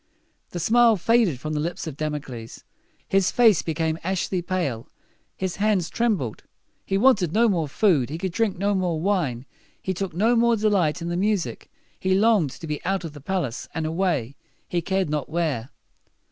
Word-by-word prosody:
The 175 - -5
smile 230 +4 +4
faded 215 - +2
from 155 +3 -4
the 150 - -1
lips 170 +4 -3
of 155 -4 -6
Damocles. 145 -7 -5 0.4
His 195 -1 +3
face 225 -7 +5
became 160 0 -1
ashy 185 0 -1
pale. 170 -11 -2 0.5
His 185 -1 -3
hands 200 -4 +1
trembled. 200 - -1 0.4
He 195 - -1
wanted 205 - +3
no 235 +2 +4
more 170 -7 +1
food; 145 - +2
he 155 - -4
could 185 +1 -3
drink 205 +1 0
no 200 +2 +1
more 180 -4 0
wine; 160 -10 0 0.3
he 190 - -2
took 190 -2 -4
no 225 +6 +3
more 235 0 +4
delight 195 -7 +1
in 170 - -3
the 175 - -2
music. 200 -2 -1 0.3
He 190 0 +1
longed 205 -6 +3
to 165 - -9
be 150 -2 -4
out 195 0 -1
of 155 - -7
the 145 - -11
palace, 145 -7 -3
and 160 -1 -1
away, 160 -7 -1 0.3
he 175 - -1
cared 190 +1 0
not 150 -3 -2
where. 150 -7 -1
175 Hz, 180 wpm, -24 LUFS, 155-200 Hz, 0.5 s, face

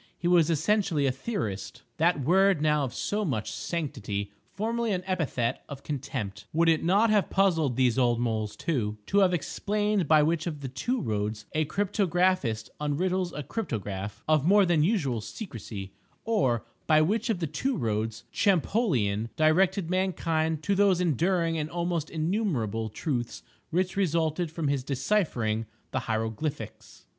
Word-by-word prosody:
He 175 - -2
was 170 -2 +4
essentially 165 -1 +1
a 135 - +3
"theorist"—that 140 - -2
word 190 +4 +4
now 150 -1 +2
of 125 - -5
so 210 - -2
much 120 - -2
sanctity, 105 - -3 0.2
formerly 230 +2 -1
an 180 -1 -2
epithet 155 -11 -1
of 140 -1 -8
contempt. 130 -8 -5
Would 165 +1 +4
it 160 -1 +2
not 205 +6 +4
have 210 -2 +2
puzzled 165 -9 +2
these 125 -1 +2
old 120 -2 +3
moles 110 -3 -1
too, 110 -10 -2
to 200 - +2
have 190 -2 +5
explained 205 +3 0
by 155 0 +6
which 160 +2 0
of 150 -4 -4
the 135 - -4
two 235 - -2
"roads" 105 - -2
a 155 0 +1
cryptographist 185 - 0
unriddles 175 +5 0
a 150 - -3
cryptograph 105 - -4
of 155 -2 +3
more 200 +1 +6
than 170 -3 +3
usual 150 - +1
secrecy, 105 - -7 0.3
or 130 - +1 0.2
by 155 -1 +5
which 205 +10 +1
of 220 - +1
the 165 - -1
two 265 - -2
roads 110 -2 -2
Champollion 150 - +1
directed 175 +3 +2
mankind 160 -4 0
to 200 - +1
those 195 -2 +4
enduring 170 0 +1
and 150 0 -3
almost 170 -2 -2
innumerable 155 - -1
truths 120 +1 -3 0.3
which 180 +2 0
resulted 170 -3 0
from 160 -1 -3
his 140 -2 0
deciphering 130 - 0 0.2
the 130 - 0
Hieroglyphics. 115 +5 -4
155 Hz, 150 wpm, -28 LUFS, 120-185 Hz, 0.3 s, by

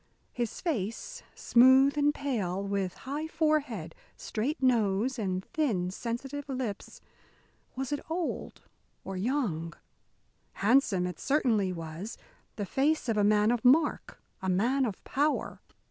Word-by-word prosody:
His 240 -3 -4
face, 280 - -3
smooth 260 +3 +5
and 295 0 +3
pale, 210 -11 -2
with 195 -2 -2
high 290 +4 -4
forehead, 300 - 0 0.2
straight 260 +9 -3
nose, 235 -1 +2
and 185 -3 -2
thin, 225 - -1
sensitive 270 +7 -5
lips 255 -6 -5 0.7
was 265 +1 -3
it 290 - 0
old 335 +1 -3 0.4
or 195 - -6
young? 185 - -1 0.8
Handsome 210 -5 +3
it 180 -2 -5
certainly 230 -9 +1
was, 165 +4 -6 0.4
the 205 - -3
face 285 +8 +1
of 225 - +2
a 205 - +3
man 210 +1 +4
of 240 -2 -1
mark, 295 +5 +3 0.2
a 190 - -2
man 245 +9 +2
of 200 - -6
power. 295 +2 -1
240 Hz, 130 wpm, -29 LUFS, 195-280 Hz, 0.8 s, smooth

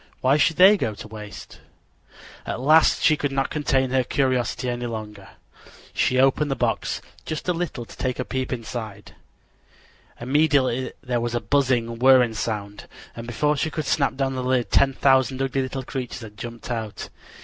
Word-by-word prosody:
Why 130 +2 +4
should 155 +2 +3
they 195 +5 +7
go 110 - -2
to 105 - -9
waste? 105 -1 -10 0.8
At - - -4
last 155 +5 +4
she 155 - +5
could 145 -2 -2
not 135 0 -1
contain 135 -4 0
her 130 -1 +2
curiosity 130 -1 0
any 120 0 -2
longer. 105 -3 -7 0.6
She 130 - +1
opened 135 +3 +3
the 135 - 0
box - - -1 0.2
just 155 +2 -5
a 180 - +2
little 165 -8 -4
to - - -14
take 125 -1 -2
a 125 - -3
peep 130 -1 -3
inside. 110 -4 -6 1.1
Immediately 130 -1 +1
there 125 -2 -1
was 120 0 -2
a - - +1
buzzing, 120 -5 0
whirring 130 -2 +5
sound, 105 -2 -4 0.3
and 115 0 -8
before 150 +6 +1
she 160 - -1
could 155 0 -4
snap 140 0 +1
down 135 0 -1
the 130 - -3
lid 125 -1 0
ten 135 -1 +4
thousand 130 0 +2
ugly 135 0 0
little 130 0 -4
creatures 125 -2 -5
had 105 -2 -10
jumped 120 +3 -8
out. 110 -3 -5
130 Hz, 175 wpm, -23 LUFS, 120-135 Hz, 1.1 s, they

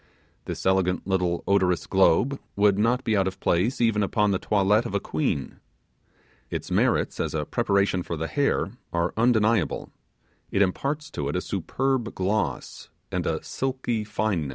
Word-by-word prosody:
This - - -5
elegant 95 -1 +2
little 90 -2 0
odorous 95 -3 +2
globe 100 +8 +3 0.2
would 100 -1 +3
not 120 +4 +2
be 110 - +1
out 95 -2 +2
of 95 - -5
place 95 +10 +1
even 115 -3 +2
upon 105 +1 +1
the 95 - 0
toilette 105 +3 +2
of 100 - -5
a - - +2
queen. 75 -5 -2 0.9
Its - - -5
merits - - +1
as - - -2
a - - -1
preparation 100 -2 +1
for 85 -1 -4
the 80 - -2
hair 140 - 0 0.2
are 85 +1 0
undeniable 110 -4 +2 0.6
it 100 - +3
imparts 140 +11 -2
to 70 -1 -3
it 75 - -3
a - - +2
superb 120 +7 -2
gloss 100 +3 -2 0.2
and - - -1
a - - -1
silky 130 -4 -2
fineness. 105 -8 -1
100 Hz, 160 wpm, -25 LUFS, 90-115 Hz, 0.9 s, globe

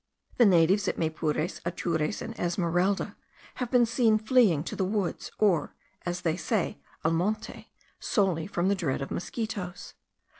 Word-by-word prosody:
The 240 - +7
natives 185 +3 +4
at - - -1
Maypures, 160 0 -1
Atures, 170 -1 -1
and 230 - -6
Esmeralda, 175 +2 0 0.5
have 250 - -1
been 245 -2 +5
seen 225 -1 +3
fleeing 215 - +3
to - - -5
the - - 0
woods, 195 -1 -2
or, 185 -8 +2 0.3
as 175 0 -2
they 165 -3 +1
say, 200 0 -1 0.2
al 160 - +4
monte, 200 +6 -2 0.3
solely 185 -7 +1
from 180 -2 -1
the 200 - +4
dread 155 -8 -1
of - - -7
mosquitos. 200 -2 -4
185 Hz, 150 wpm, -28 LUFS, 165-215 Hz, 0.5 s, The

